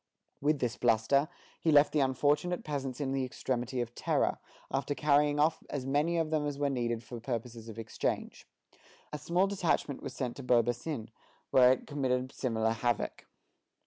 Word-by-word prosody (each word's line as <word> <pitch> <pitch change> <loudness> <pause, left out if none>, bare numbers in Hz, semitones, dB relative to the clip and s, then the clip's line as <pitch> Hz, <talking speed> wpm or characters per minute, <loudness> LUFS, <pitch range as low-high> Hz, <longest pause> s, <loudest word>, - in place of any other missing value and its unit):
With 150 +2 +2
this 125 -3 -2
bluster, 120 +5 +3 0.3
he 160 - +2
left 145 0 +6
the 155 - +3
unfortunate 145 +6 +1
peasants 135 -3 -4
in 140 -2 -1
the 135 -1 0
extremity 125 0 -2
of 120 0 -5
terror, - - 0 0.3
after 140 +1 -1
carrying 145 +1 +3
off 155 +2 +2
as 135 -3 -3
many 150 +5 +1
of 160 -1 0
them 150 -2 +1
as 145 -1 -3
were 145 -1 0
needed 120 -3 -1
for 120 +1 -8
purposes 115 -1 -5
of 110 - -9
exchange. 115 - -3 0.7
A 150 - -3
small 175 +5 +2
detachment 180 -7 0
was 125 - -6
sent 125 -2 -3
to 140 - -7
Beaubassin, 120 +1 0 0.4
where 125 -1 +7
it 130 - 0
committed 130 -3 -1
similar 110 -4 0
havoc. 115 0 -2
135 Hz, 170 wpm, -31 LUFS, 120-145 Hz, 0.7 s, where